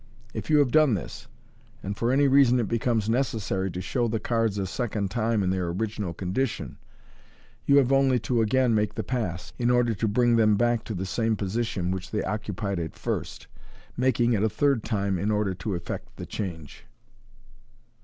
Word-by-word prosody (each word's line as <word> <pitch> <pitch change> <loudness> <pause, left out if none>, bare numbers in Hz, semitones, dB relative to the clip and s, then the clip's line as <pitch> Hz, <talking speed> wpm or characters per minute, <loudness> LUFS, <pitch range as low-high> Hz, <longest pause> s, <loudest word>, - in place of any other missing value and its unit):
If 110 -3 -6
you 155 - +5
have 140 -4 +3
done 155 -6 +5
this, 85 -10 -7 0.6
and 100 +1 -3
for 115 +3 0
any 140 +2 +4
reason 130 -2 +5
it 115 - 0
becomes 115 -1 0
necessary 110 -6 0
to 90 +1 -5
show 120 +4 -1
the 110 0 -1
cards 115 -3 0
a 100 - -1
second 105 -1 -3
time 115 -2 0
in 90 - +1
their 95 -2 -1
original 100 +1 -3
condition, 95 +9 -3 0.9
you 140 - +6
have 135 -2 +4
only 135 -2 +4
to 120 -1 +1
again 125 +2 +2
make 105 -1 0
the - - -2
pass, 100 -10 -3
in 120 0 +2
order 120 -1 +3
to 110 +2 -1
bring 120 +2 +3
them 110 -2 +4
back 120 +1 +1
to 110 - -4
the 95 +2 -3
same 110 +5 0
position 100 -2 -2
which 95 -1 -4
they 105 - -2
occupied 100 -1 -3
at 80 -2 -5
first, - - -4 0.5
making 120 -1 +2
it 105 - +1
a 110 - +2
third 130 +2 +1
time 100 -4 -1
in 100 - -1
order 105 -2 +1
to 95 +2 -4
effect 85 - -6
the - - -6
change. 80 - -7
110 Hz, 190 wpm, -26 LUFS, 95-120 Hz, 0.9 s, you